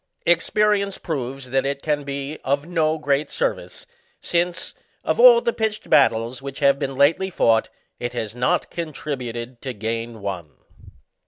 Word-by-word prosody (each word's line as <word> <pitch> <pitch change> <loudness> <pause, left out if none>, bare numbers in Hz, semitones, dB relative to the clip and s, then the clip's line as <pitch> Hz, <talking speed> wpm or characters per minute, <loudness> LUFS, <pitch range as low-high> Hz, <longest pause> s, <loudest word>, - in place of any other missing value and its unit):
Expe 175 +5 +3
rience 200 -1 0
proves 135 -4 -5
that 135 0 +2
it 140 0 -3
can 150 -2 0
be 140 +1 -5
of 140 +2 0
no 160 -2 +1
great 145 -1 0
service, - - -3 0.3
since, 175 0 -1 0.3
of - - -1
all 485 -1 +9
the 475 - 0
pitched 220 -1 -3
battles 115 -2 +3
which 135 0 -7
have 140 -1 +3
been 135 -2 -3
lately 155 +8 +3
fought, 115 -10 +2 0.3
it 120 0 -4
has 110 -2 -4
not 125 +1 0
contributed 130 -7 -5
to 130 -2 -4
gain 115 +2 -4
one. 90 -7 -5
140 Hz, 155 wpm, -22 LUFS, 120-165 Hz, 0.3 s, all